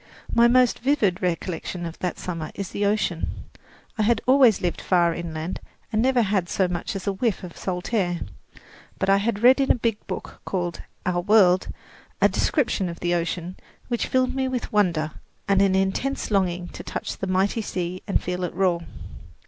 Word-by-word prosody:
My 235 0 +6
most 250 0 +4
vivid 230 -9 +1
recollection 175 0 -3
of 165 0 -7
that 180 - -2
summer 165 -4 -4
is 195 -2 -4
the 205 0 0
ocean. 200 -5 -1 0.6
I - - +4
had 225 +1 +3
always 255 -5 +6
lived 175 -1 -2
far 175 -2 +3
inland 165 0 -4 0.3
and 215 +1 +2
had 260 +1 +2
never 245 - +5
had 195 -4 0
so 190 - +1
much 175 +2 -4
as 195 - -5
a 200 - 0
whiff 210 0 -1
of 175 -2 -8
salt 180 +4 -4
air; 175 -5 +1 0.8
but 195 - +1
I 195 - +6
had 205 +1 -1
read 260 +3 +7
in 270 - +1
a - - +6
big 230 -3 -1
book - - -6
called 175 -3 -3 0.2
"Our 175 -1 +1
World" 190 -2 +4 0.5
a - - +6
description 230 - 0
of 170 - -7
the 175 0 0
ocean 175 +1 -2 0.3
which 240 -2 -1
filled 255 0 +1
me 265 0 0
with 255 -4 -3
wonder 170 -7 +2 0.4
and 195 -1 +4
an 195 -1 +3
intense 195 +8 -1
longing 180 -3 0
to - - -9
touch - - -5
the 195 - -3
mighty 190 +4 +1
sea 180 -3 -4
and 200 - +2
feel 180 0 -3
it 175 - -3
roar. 180 -2 +2
190 Hz, 190 wpm, -24 LUFS, 175-225 Hz, 0.8 s, read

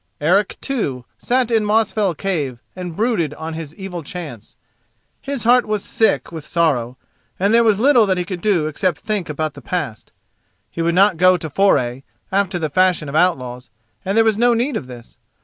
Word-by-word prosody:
Eric, 185 +7 +2
too, 140 - -3
sat 250 -1 0
in 225 -2 +3
Mosfell 210 -3 +1
cave 150 -9 -2 0.2
and 180 -3 -6
brooded 210 - 0
on 160 +1 -6
his 160 -1 -7
evil 190 -3 -6
chance. 150 - -8 0.7
His 275 -2 -4
heart 245 +1 +4
was 210 -1 -1
sick 220 - +1
with 160 -3 -7
sorrow, 140 -7 0 0.4
and 200 +4 +2
there 235 0 +5
was 215 -3 +3
little 245 -3 +5
that 190 -1 +1
he 180 - -1
could 185 -2 -6
do 185 -7 +2
except 155 +2 -1
think 210 -6 -3
about 155 0 -2
the - - -12
past. 150 - -4 0.6
He 170 - -4
would 170 +1 +1
not 195 -1 +4
go 185 +1 +5
to 160 -3 -7
foray, 130 -9 +2 0.3
after 195 -1 +1
the 160 -3 -1
fashion 175 -1 +1
of 140 - -6
outlaws, 125 -8 0 0.3
and 195 +3 -1
there 225 - +5
was 220 -1 +2
no 240 0 +4
need 245 +3 -1
of 130 - -4
this. 120 -2 -13
180 Hz, 190 wpm, -19 LUFS, 155-215 Hz, 0.7 s, there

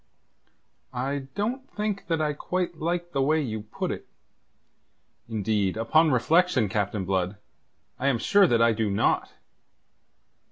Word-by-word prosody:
"I 135 +2 -2
don't 245 +7 -2
think 210 -1 -3
that 165 -2 0
I 150 -1 0
quite 175 +2 -3
like 175 +2 -2
the 135 - 0
way 155 +4 +3
you 110 -7 -3
put 105 +1 -4
it. - - -6 1.2
Indeed, 105 -2 0
upon 155 +8 +4
reflection, 145 - +3
Captain 100 -1 -1
Blood, 95 +1 -1 0.6
I 135 - 0
am 135 -4 +3
sure 200 - +4
that 115 -5 +3
I 115 - +5
do 110 -1 0
not." 100 - +1
135 Hz, 135 wpm, -26 LUFS, 110-170 Hz, 1.2 s, I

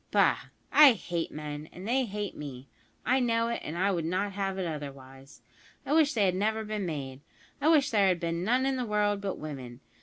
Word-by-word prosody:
Bah! - - +3 0.3
I 295 -4 +9
hate 170 -4 -4
men, 150 0 -6
and 185 +3 -9
they 260 +2 +2
hate 205 -2 -4
me, 135 -3 -8 0.4
I 260 +1 +3
know 230 -2 +1
it, 235 - -3
and 160 - -5
I 195 +3 +2
would 170 -3 -1
not 185 +5 -1
have 195 -1 -2
it 190 - -2
otherwise. 135 -3 -8 0.4
I 280 - -1
wish 305 -3 +4
they 210 -3 +3
had 185 - +2
never 220 +4 0
been 210 -3 -3
made. 135 -4 -5 0.4
I 295 - +2
wish 300 -4 +4
there 205 -3 +4
had 180 -2 +2
been 170 0 -2
none 250 +6 +2
in 270 -1 0
the 250 - -2
world 205 -1 +1
but 195 -2 -3
women. 130 -5 -7
195 Hz, 215 wpm, -29 LUFS, 155-230 Hz, 0.4 s, I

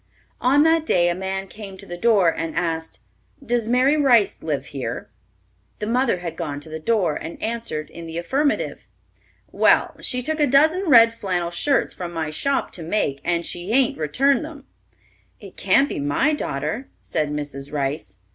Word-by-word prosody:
On 275 +4 +4
that 320 0 +3
day 175 - +2
a - - +1
man 190 +1 -3
came 195 -1 -10
to 195 - -12
the 175 - -7
door 200 -2 +4
and 165 -1 -4
asked, 165 - -2 0.5
"Does 235 -1 0
Mary 255 +5 +3
Rice 250 -8 +3
live 150 -3 -2
here?" 125 -5 -5 0.7
The 210 - -4
mother 240 -1 +1
had 170 -2 -5
gone 150 -4 -4
to 160 - -11
the 160 0 -5
door, 180 -4 +1
and 160 +3 -7
answered 220 -10 -4
in 170 -1 -9
the 165 0 -6
affirmative. 275 - 0 0.7
"Well, - - +3
she 250 0 -1
took 315 +3 -2
a 295 - +4
dozen 315 +7 +3
red 230 -4 +7
flannel 180 -6 -2
shirts 275 +11 +1
from 175 -1 -6
my 160 -2 -3
shop 275 - -1
to 175 - -8
make, 160 -5 -1
and 170 0 0
she 175 +2 -6
hain't 260 +1 +3
returned 270 - +2
'em!" 310 -2 -10 0.7
"It - - -12
can't 275 +1 +3
be - - -4
my 145 - +1
daughter," 155 - -3
said 150 -1 -2
Mrs. 145 -1 -5
Rice. 135 -9 -3
190 Hz, 175 wpm, -22 LUFS, 160-255 Hz, 0.7 s, red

